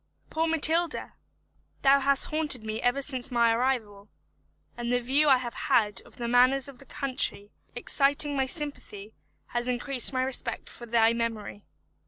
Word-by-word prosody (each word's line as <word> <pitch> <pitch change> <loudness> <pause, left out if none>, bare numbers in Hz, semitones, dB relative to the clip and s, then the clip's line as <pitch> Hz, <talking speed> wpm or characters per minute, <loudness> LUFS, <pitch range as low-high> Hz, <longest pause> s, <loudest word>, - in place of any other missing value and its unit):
Poor 320 +1 -1
Matilda! 325 +1 +3 0.7
thou 275 0 +5
hast 275 0 +1
haunted 300 -7 +1
me 220 0 -5
ever 260 +3 0
since 260 -2 0
may 235 -2 +2
arrival; 225 -5 -2 0.7
and 240 0 -4
the 245 - +1
view 275 +5 +1
I 265 - +6
have 245 -2 -6
had 210 -3 0
of - - -18
the 235 - -5
manners 255 +3 +3
of 275 -4 -13
the 275 - -13
country, 255 -7 -3 0.2
exciting 285 +3 +2
my 265 -1 0
sympathy, 255 -9 -6 0.4
has 240 0 -3
increased 250 +1 +1
my 255 -1 -1
respect 260 0 -4
for 240 - -11
thy 230 0 +3
memory. 225 -3 -5
250 Hz, 160 wpm, -26 LUFS, 235-275 Hz, 0.7 s, I